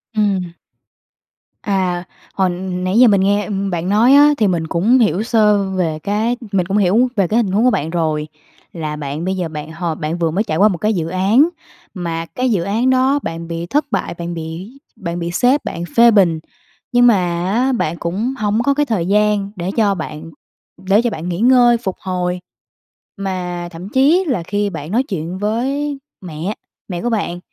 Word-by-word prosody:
Ừm. 195 -5 0 1.1
À, 185 -3 -1 0.3
hồi 190 -1 +1 0.2
nãy 185 +4 0
giờ 250 - +8
mình 200 -3 +4
nghe, 205 +2 +2
ừm, 200 -2 -2
bạn 175 0 -2
nói 225 +6 +5
á 290 +1 +7
thì 215 - +2
mình 170 -4 -1
cũng 215 +11 +3
hiểu 210 -3 +2
sơ 210 -3 +3
về 170 -5 -1
cái 220 +4 0
mình 190 -3 +1
cũng 195 +3 -1
hiểu 210 +6 +3
về 195 -3 +2
cái 220 - 0
hình 215 -6 +1
huống 205 +4 +2
của - - +6
bạn 160 -7 -1
rồi. 155 -3 -1 0.5
Là 155 -3 -4
bạn 150 +2 -5
bây 190 +1 -1
giờ 180 -2 -2
bạn 155 0 -7
h 165 +3 -9 0.2
bạn 155 +3 -2
vừa 165 -2 0
mới 200 +6 0
trải 155 -7 -2
qua 200 +4 +5
một 190 -5 -1
cái 215 +5 0
dự 165 -4 -2
án, 200 - +3 0.4
mà 165 -3 -4
cái 250 +9 -2
dự 190 -6 +1
án 225 +7 0
đó 260 +2 +3
bạn 165 0 -5
bị 170 0 -4
thất 290 - 0
bại, - - -1
bạn 170 0 -5
bị 165 +4 -6 0.3
bạn 175 -6 -5
bị 170 0 -3
sếp 255 +10 +2
bạn 170 - -4
phê 235 0 +7
bình. 180 -7 +3 0.5
Nhưng 245 0 +5
mà 235 - +6 0.4
á 255 +3 +2
bạn 170 -9 -1
cũng 205 +10 -2
hổng 215 +1 0
có 280 +2 +2
cái 295 +1 +1
thời 205 -9 -1
gian 210 0 +1
để 175 +1 -3
cho 210 -3 +3
bạn 155 -3 -6 0.6
để 200 +4 +4
cho 240 - 0
bạn 175 -4 -5
nghỉ 175 +1 -3
ngơi, 245 0 +5
phục 190 -4 -3
hồi 180 -1 -2 0.8
mà 180 -3 -4
thậm 175 +3 -9
chí 285 - +3
là 240 - -1
khi 205 +3 -1
bạn 155 -3 -7
nói 240 +5 +2
chuyện 180 -5 -5
với 270 +8 -1 0.2
mẹ, 175 +2 -5 0.4
mẹ 175 -2 -4
của 240 - -1
bạn 200 -6 -2
195 Hz, 205 wpm, -18 LUFS, 170-225 Hz, 1.1 s, giờ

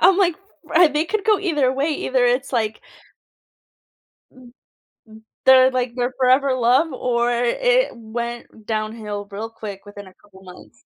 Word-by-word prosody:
I'm 365 +2 +5
like, 360 -5 +2 0.3
ri 330 +1 +4
they 300 +2 -1
could 430 +4 -3
go 430 -2 +3
either 295 -9 0
way, 275 +4 -1
either 260 -4 0
it's, 250 +3 0
like 220 -3 -1 1.5
M - - -28
m 245 -1 -16 0.9
they're, 260 0 +6
like, 250 -1 -2
their 250 +1 -2
forever 260 +1 +3
love, 255 +6 +2
or 240 -1 0
it - - +1
went 235 -1 -7
downhill 215 -2 -4
real 220 +3 -6
quick 210 -3 -9
within 205 -1 -11
a 185 - -16
couple 190 -2 -21
months. 180 -1 -15
250 Hz, 155 wpm, -21 LUFS, 225-290 Hz, 1.5 s, they're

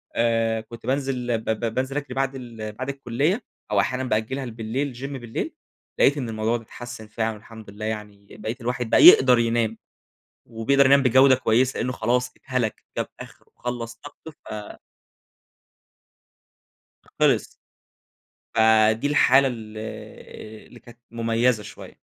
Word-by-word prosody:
آآ 115 -1 +1
كنت 115 +1 -12
بانزل 130 -3 -1
ب 110 - -9
ب 110 +1 -1
بانزل 130 +3 -2
أجري 145 -3 -4
بعد 135 0 -1
ال 115 -4 -7
بعد 130 +5 -5
الكلية 140 - -1 0.3
أو 105 - +3
أحيانًا 125 +6 0
بأجلها 130 +3 -1
لبالليل 120 +4 -3
gym 130 +3 -7 0.2
بالليل، 115 -1 -4 0.5
لقيت 140 - +4
إن 125 -5 -3
الموضوع 110 +1 0
ده 115 - -12
اتحسن 120 -1 -9
فعلًا 110 +1 -2
والحمد 110 0 -13
لله 105 +2 -7
يعني 105 -2 -6
بقيت 110 +4 -5
الواحد 125 0 -2
بقى - - +5
يقدر 125 -2 +8
ينام، 115 -1 0 0.7
وبيقدر 130 +5 +2
ينام 140 +1 +6
بجودة 130 +1 +6
كويسة، 130 +1 +1
لأنه 125 +2 -1
خلاص 125 +2 0
اتهلك، 130 -5 -3
جاب - - -1
آخره - - -12
وخلص 120 -1 -5
طاقته 145 +6 -12
ف 105 -8 -9 2.4
خلص. - - +3 1.1
فدي 110 +2 +4
الحالة 140 -2 +5
ال 110 -3 -8 0.9
اللي 120 - -15
كانت 120 +1 -16
مميزة 115 0 +1
شوية. - - -12
120 Hz, 140 wpm, -24 LUFS, 110-130 Hz, 2.4 s, يقدر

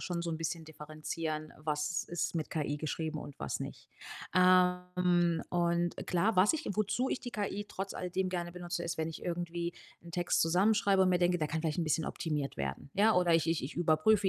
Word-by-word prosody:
schon 175 -2 -3
so 170 - -2
'n 160 - -2
bisschen 165 0 -3
differenzieren, 155 0 -5
was 150 +2 -1
ist 175 0 -2
mit 155 - -2
KI 145 -2 -1
geschrieben 155 +1 -3
und 145 - -8
was - - -2
nicht. - - -7 0.5
Ähm, 180 -2 +4
und 175 0 +1
klar, 190 +5 +2
was 190 - +6
ich 320 0 -3
wozu 215 +5 +1
ich 255 - -1
die 245 - -7
KI 205 0 -2
trotz 195 +1 -4
alledem 185 +1 -2
gerne 175 -1 -3
benutze, 175 -1 -4
ist, 170 - -3
wenn 160 0 -1
ich 160 - -8
irgendwie 170 0 -2 0.3
'n 170 - -11
Text 175 0 +1
zusammenschreibe 195 +3 +4
und 185 - +4
mir 180 -1 +3
denke: 175 0 +3
„Der 155 -2 -1
kann 160 +1 -1
vielleicht 160 +1 -1
'n 170 - +1
bisschen 155 +1 +1
optimiert 150 -5 -2
werden“, 70 - -4
ja? 215 +2 +5
Oder 175 -2 +4
ich 165 0 +3
ich 165 -5 +1
ich 135 - -6
überprüfe 175 +5 +3
175 Hz, 205 wpm, -32 LUFS, 160-180 Hz, 0.5 s, was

